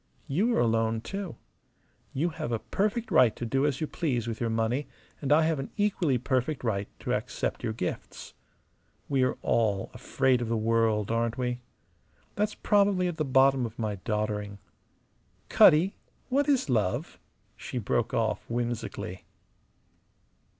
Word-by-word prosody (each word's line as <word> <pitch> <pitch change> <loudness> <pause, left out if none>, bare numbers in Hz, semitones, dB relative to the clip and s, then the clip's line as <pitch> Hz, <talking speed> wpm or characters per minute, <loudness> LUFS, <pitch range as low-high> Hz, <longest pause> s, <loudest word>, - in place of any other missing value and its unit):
You 205 - +1
are - - +2
alone, 115 -1 +1
too. 195 - -5 0.8
You 160 +6 0
have 135 -6 -5
a 115 - +1
perfect 215 - -2
right 130 -9 +5
to 120 - -5
do 135 +5 +1
as 135 -3 -1
you - - +1
please 130 -8 -2
with 115 0 -4
your 115 - 0
money, 115 +5 0 0.3
and 140 -1 -2
I 155 +2 +6
have 160 -2 +1
an 135 - -5
equally 185 -10 +1
perfect 130 +3 -1
right 100 -4 -1
to - - -1
accept - - -2
your - - -1
gifts. 90 -5 -5 0.7
We 135 -2 +1
are 130 - +1
all 105 -4 +1
afraid 130 -2 +1
of 115 - -3
the 115 - +1
world, 110 -1 +1
aren't 115 0 0
we? 125 -1 -2 0.7
That's 210 +1 -1
probably 200 -3 +2
at 175 -2 -4
the 155 - +1
bottom 135 -1 +4
of 115 -1 -5
my 110 -3 -2
doddering. 105 0 -2 0.9
Cutty, 170 +6 +6 0.3
what 285 +3 +2
is 270 - +2
love?" 110 -8 -1 0.4
she - - -6
broke 115 0 0
off, 110 -3 0
whimsically. 120 -6 -4
125 Hz, 155 wpm, -28 LUFS, 115-155 Hz, 0.9 s, I